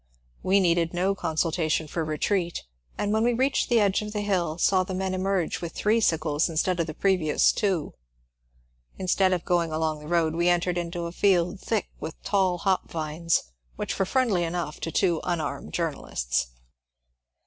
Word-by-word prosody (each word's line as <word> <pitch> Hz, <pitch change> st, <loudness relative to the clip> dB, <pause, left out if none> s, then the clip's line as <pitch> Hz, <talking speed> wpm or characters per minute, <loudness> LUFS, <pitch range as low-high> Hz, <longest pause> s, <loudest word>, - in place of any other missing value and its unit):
We 195 Hz, +2 st, +3 dB
needed 170 Hz, -2 st, +2 dB
no 185 Hz, +3 st, +1 dB
consulta 165 Hz, -2 st, -1 dB
tion 155 Hz, 0 st, 0 dB
for 165 Hz, +2 st, -2 dB
retreat, 170 Hz, +3 st, -1 dB, 0.3 s
and 205 Hz, 0 st, 0 dB
when 220 Hz, +1 st, +2 dB
we 240 Hz, +1 st, +3 dB
reached 265 Hz, +3 st, +1 dB
the 240 Hz, -2 st, +4 dB
edge 200 Hz, -1 st, +2 dB
of 210 Hz, 0 st, -6 dB
the 210 Hz, -, -1 dB
hill 180 Hz, -6 st, 0 dB
saw 185 Hz, +1 st, +3 dB
the 185 Hz, 0 st, -5 dB
men 190 Hz, 0 st, -2 dB
emerge 185 Hz, -2 st, -1 dB
with 170 Hz, -1 st, -5 dB
three 215 Hz, +2 st, +2 dB
sickles 155 Hz, -4 st, +1 dB
instead 170 Hz, +2 st, 0 dB
of 170 Hz, -, 0 dB
the 155 Hz, -, -6 dB
previ 185 Hz, -6 st, +1 dB
ous -, -, +4 dB
two. 190 Hz, -7 st, -1 dB, 1.0 s
Instead 185 Hz, 0 st, +2 dB
of 180 Hz, -2 st, -1 dB
going 170 Hz, -2 st, +1 dB
along 155 Hz, -1 st, -1 dB
the 150 Hz, -, -11 dB
road 165 Hz, -1 st, +1 dB
we 170 Hz, +2 st, +2 dB
entered 175 Hz, 0 st, +1 dB
into 170 Hz, 0 st, -4 dB
a 170 Hz, -, -4 dB
field 180 Hz, 0 st, +2 dB
thick 220 Hz, 0 st, -1 dB
with 160 Hz, -, -7 dB
tall 190 Hz, -3 st, +1 dB
hop 190 Hz, +2 st, 0 dB
vines 160 Hz, -, -1 dB, 0.2 s
which -, -, -4 dB
were 195 Hz, -, +3 dB
friendly 225 Hz, -8 st, +2 dB
enough 170 Hz, -2 st, -3 dB
to 165 Hz, -, -4 dB
two 175 Hz, -3 st, +1 dB
unarmed 170 Hz, -3 st, -3 dB
journalists. 60 Hz, -, -2 dB
175 Hz, 180 wpm, -26 LUFS, 165-195 Hz, 1.0 s, the